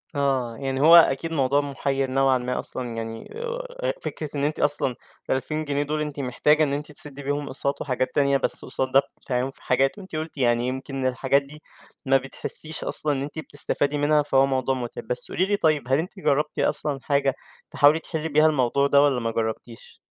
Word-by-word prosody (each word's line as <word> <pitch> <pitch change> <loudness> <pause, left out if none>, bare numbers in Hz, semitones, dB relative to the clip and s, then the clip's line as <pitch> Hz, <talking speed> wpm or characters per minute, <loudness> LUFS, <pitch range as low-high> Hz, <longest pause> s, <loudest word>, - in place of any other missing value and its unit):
آه، 130 -5 0
يعني 135 -1 -2
هو 165 +3 +8
أكيد 165 -1 +5
موضوع 140 -2 +2
مُحير 135 -1 -2
نوعًا 135 0 +3
ما 125 0 -3
أصلًا 120 -2 -5
يعني 115 0 -6
أ - - -11 0.5
أ - - +2
أ - - 0
فكرة 155 - -5
إن 140 - -1
أنتِ 150 +1 -1
أصلًا 145 -3 +1 0.3
ال2000 155 +4 -1
جنيه 145 0 0
دُول 150 +1 -2
أنتِ 150 -1 -4
محتاجة 150 +4 +2
إن 140 -2 0
أنتِ 150 +2 -4
تسدي 145 -1 -3
بيهم 145 +1 -2
أقساط 140 +1 -3
وحاجات 130 -2 -2
تانية، 140 -1 +3
بس - - -2
قُصاد 130 0 -2
ده 135 - +6
بتدفعيهم، 130 -2 -3
في - - -20
حاجات. 135 +5 +1
وأنتِ 190 -5 -9
قلتِ 155 0 -5
يعني 120 -2 +2
يمكن 130 +1 -4
الحاجات 130 +2 +2
دي 150 +2 -14 0.4
ما 135 0 +4
بتحسيش 135 +4 -3
أصلًا 150 -1 +1
إن 135 - -2
أنتِ 145 +3 -6
بتستفادي 145 0 0
منها 150 +1 +3
فهو 135 -2 +3
موضوع 135 -1 0
متعب. 120 -3 -6
بس 125 +1 -1
قولي 185 - +1
لي 205 +1 0
طيب 155 -8 +1
هل 135 +1 +3
أنتِ 180 +4 -5
جربتِ 150 -2 0
أصلًا 145 -2 0
حاجة 140 -2 +1 0.4
تحاولي 145 +2 +5
تحلي 160 -1 -4
بيها 155 +1 +4
الموضوع 140 -1 +2
ده، 140 0 +5
والّا 140 -3 +3
ما 115 -1 -2
جربتيش؟ 115 +1 -5
140 Hz, 205 wpm, -24 LUFS, 130-150 Hz, 0.5 s, هو